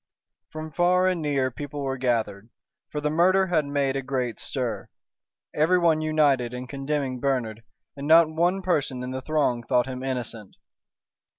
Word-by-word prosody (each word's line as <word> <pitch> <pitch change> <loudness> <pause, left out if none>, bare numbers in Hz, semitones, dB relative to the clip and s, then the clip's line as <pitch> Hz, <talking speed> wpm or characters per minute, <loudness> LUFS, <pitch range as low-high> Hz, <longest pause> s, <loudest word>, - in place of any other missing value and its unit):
From 155 0 -7
far 180 +3 +3
and 185 -3 +1
near 140 -3 0
people 145 +2 -6
were 135 -1 -2
gathered, 115 -5 -1 0.4
for 150 - -4
the 150 0 -1
murder 185 +4 +4
had 165 -5 0
made 140 -1 0
a 135 - -1
great 130 -3 -3
stir. 120 -7 -4 0.6
Everyone 165 0 +3
united 145 -6 +2
in 125 +1 -5
condemning 135 -1 -3
Bernard, 120 -5 -1 0.3
and 140 +1 -6
not 165 +1 +7
one 175 +4 0
person 145 -8 -1
in 125 - -5
the 130 0 -4
throng 140 -5 0
thought 125 +1 +1
him 130 -1 -6
innocent. 120 -6 -5
140 Hz, 160 wpm, -25 LUFS, 125-155 Hz, 0.6 s, not